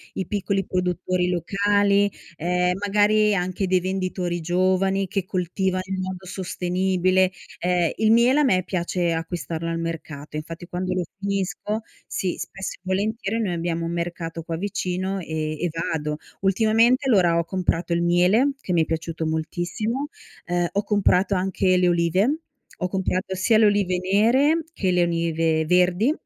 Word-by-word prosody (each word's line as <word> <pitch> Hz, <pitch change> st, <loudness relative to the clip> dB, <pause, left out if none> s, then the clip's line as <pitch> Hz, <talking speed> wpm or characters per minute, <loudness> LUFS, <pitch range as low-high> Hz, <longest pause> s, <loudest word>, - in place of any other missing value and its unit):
i 190 Hz, -, -3 dB
piccoli 200 Hz, -1 st, -1 dB
produttori 180 Hz, 0 st, -1 dB
locali, 200 Hz, +3 st, +2 dB, 0.2 s
ehm, 180 Hz, +2 st, +1 dB
magari 210 Hz, +1 st, +3 dB
anche 185 Hz, +1 st, -1 dB
dei 185 Hz, 0 st, +3 dB
venditori 185 Hz, -1 st, -2 dB
giovani 185 Hz, +3 st, +1 dB
che 195 Hz, +1 st, -2 dB
coltivano 185 Hz, +1 st, -1 dB
in 190 Hz, 0 st, -2 dB
modo 185 Hz, 0 st, -5 dB
sostenibile. 185 Hz, 0 st, +1 dB, 0.3 s
Ehm, 175 Hz, -1 st, +1 dB
il 220 Hz, 0 st, +3 dB
miele 245 Hz, +5 st, +5 dB
a -, -, +3 dB
me 185 Hz, -10 st, +3 dB
piace 175 Hz, -1 st, -1 dB
acquistarlo 165 Hz, 0 st, -4 dB
al 165 Hz, 0 st, -2 dB
mercato, 155 Hz, -3 st, -6 dB
infatti 165 Hz, +3 st, -6 dB
quando 185 Hz, +1 st, -2 dB
lo 185 Hz, -1 st, 0 dB
finisco 200 Hz, +2 st, -2 dB, 0.3 s
sì, 185 Hz, -2 st, -2 dB
spesso 190 Hz, +1 st, -5 dB
e -, -, -29 dB
volentieri 205 Hz, +3 st, -1 dB
noi 195 Hz, -5 st, -1 dB
abbiamo 170 Hz, 0 st, -2 dB
un 170 Hz, -, -3 dB
mercato 170 Hz, -1 st, -4 dB
qua 165 Hz, 0 st, -4 dB
vicino 200 Hz, +3 st, -3 dB, 0.4 s
eh 165 Hz, -, -11 dB, 0.3 s
e 175 Hz, -, +1 dB
vado. 150 Hz, -2 st, -2 dB, 0.2 s
Ultimamente, 225 Hz, +6 st, +3 dB
allora 180 Hz, -8 st, +4 dB
ho 170 Hz, -, +2 dB
comprato 175 Hz, -1 st, -1 dB
il 170 Hz, -, +1 dB
miele 180 Hz, +11 st, +3 dB
che 180 Hz, -, -3 dB
mi 170 Hz, -, +4 dB
è -, -, +2 dB
piaciuto 160 Hz, 0 st, -3 dB
moltissimo, 175 Hz, -, -2 dB, 0.4 s
ehm, 175 Hz, 0 st, 0 dB
ho 200 Hz, -, 0 dB
comprato 200 Hz, -1 st, +2 dB
anche 185 Hz, 0 st, +1 dB
le 180 Hz, 0 st, +3 dB
olive, 175 Hz, -, +2 dB, 0.4 s
ho 180 Hz, -, -1 dB
comprato 190 Hz, +1 st, -2 dB
sia 210 Hz, +4 st, +3 dB
le 220 Hz, -, +6 dB
olive 200 Hz, -3 st, +2 dB
nere 265 Hz, +11 st, +4 dB
che 190 Hz, -, -1 dB
le 180 Hz, -1 st, +3 dB
olive 165 Hz, -2 st, +1 dB
verdi, 180 Hz, -, +3 dB
185 Hz, 155 wpm, -23 LUFS, 175-200 Hz, 0.4 s, le